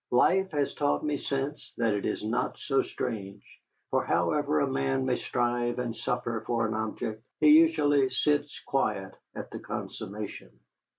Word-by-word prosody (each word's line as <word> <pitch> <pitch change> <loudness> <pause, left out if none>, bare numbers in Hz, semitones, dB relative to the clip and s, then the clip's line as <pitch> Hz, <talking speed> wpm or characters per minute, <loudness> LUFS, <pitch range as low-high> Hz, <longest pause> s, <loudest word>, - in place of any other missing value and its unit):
Life 190 +10 +4
has 145 -2 0
taught 145 +1 0
me 150 -1 +1
since 140 +1 -3
that 115 -3 +2
it 105 - -1
was - - -3
not 110 +3 -1
so 135 -2 +1
strange, 100 -3 -5 0.5
for - - +2
however 75 - +1
a - - +3
man 65 -1 0
may - - +2
strive 120 0 0
and 120 -2 -2
suffer 120 -1 -2
for 115 -2 +1
an 110 - -2
object, 110 0 -3 0.2
he 150 - +6
usually 150 -3 +5
sits 145 +2 0
quiet 95 -8 -1 0.2
at - - -7
the - - -6
consummation. 105 +1 -6
120 Hz, 160 wpm, -29 LUFS, 110-145 Hz, 0.5 s, he